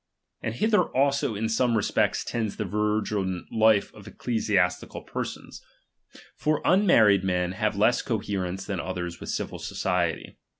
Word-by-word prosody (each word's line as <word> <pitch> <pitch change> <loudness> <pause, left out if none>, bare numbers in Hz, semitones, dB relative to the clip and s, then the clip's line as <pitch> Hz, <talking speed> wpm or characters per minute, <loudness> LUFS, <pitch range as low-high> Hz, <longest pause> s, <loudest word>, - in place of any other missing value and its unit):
And 110 - -3
hither 215 - +3
also 140 -4 +2
in 110 +2 -1
some 115 +1 +2
respect 105 - 0
tends 110 -3 -2
the 105 - -3
virgin 105 -2 -1
life 110 -2 +3
of - - -13
ecclesiastical 100 -6 -1
per - - -3
sons; - - -9 0.7
for 155 0 0
unmarried 115 - +5
men 90 -1 0
have 105 +1 -1
less 110 +4 +3
coherence 95 -4 -3
than 95 -3 -3
others 90 -1 -4
with - - -8
civil - - -3
society. 85 -3 -2
105 Hz, 140 wpm, -26 LUFS, 95-115 Hz, 0.7 s, unmarried